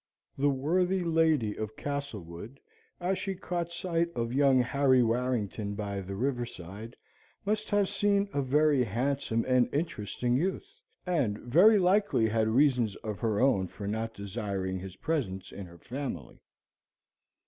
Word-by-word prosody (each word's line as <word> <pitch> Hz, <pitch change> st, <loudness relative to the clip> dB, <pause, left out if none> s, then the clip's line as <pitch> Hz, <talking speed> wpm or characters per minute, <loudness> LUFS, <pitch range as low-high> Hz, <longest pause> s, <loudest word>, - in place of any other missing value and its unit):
The 145 Hz, +1 st, +2 dB
worthy 180 Hz, +7 st, +1 dB
lady 160 Hz, -10 st, +2 dB
of 110 Hz, 0 st, -5 dB
Castlewood, 120 Hz, -, -6 dB, 0.4 s
as 185 Hz, +2 st, -1 dB
she 195 Hz, -1 st, -3 dB
caught 175 Hz, -1 st, -3 dB
sight 170 Hz, -1 st, -1 dB
of 115 Hz, 0 st, -2 dB
young 135 Hz, -1 st, +4 dB
Harry 130 Hz, 0 st, +3 dB
Warrington 115 Hz, -3 st, -1 dB
by 100 Hz, -2 st, -3 dB
the 95 Hz, +1 st, -6 dB
river 125 Hz, +3 st, -1 dB
side, 105 Hz, +2 st, -9 dB, 0.5 s
must 215 Hz, +1 st, -1 dB
have 205 Hz, -2 st, +2 dB
seen 200 Hz, 0 st, +1 dB
a 140 Hz, -, +1 dB
very 145 Hz, 0 st, +3 dB
handsome 120 Hz, +1 st, -1 dB
and 125 Hz, -1 st, +3 dB
interesting 125 Hz, -, -1 dB
youth, 180 Hz, +8 st, -1 dB, 0.4 s
and 145 Hz, -, 0 dB
very 175 Hz, -, +5 dB
likely 190 Hz, -, +3 dB
had 110 Hz, 0 st, +1 dB
reasons 120 Hz, -3 st, +3 dB
of 105 Hz, -3 st, -4 dB
her 110 Hz, -1 st, 0 dB
own 125 Hz, -8 st, +3 dB
for 100 Hz, +3 st, -8 dB
not 110 Hz, +2 st, -3 dB
desiring 100 Hz, -2 st, -3 dB
his 95 Hz, 0 st, -8 dB
presence 95 Hz, -, -3 dB
in 100 Hz, -2 st, -8 dB
her 85 Hz, 0 st, -14 dB
family. 125 Hz, -, -6 dB
125 Hz, 145 wpm, -29 LUFS, 105-160 Hz, 0.5 s, very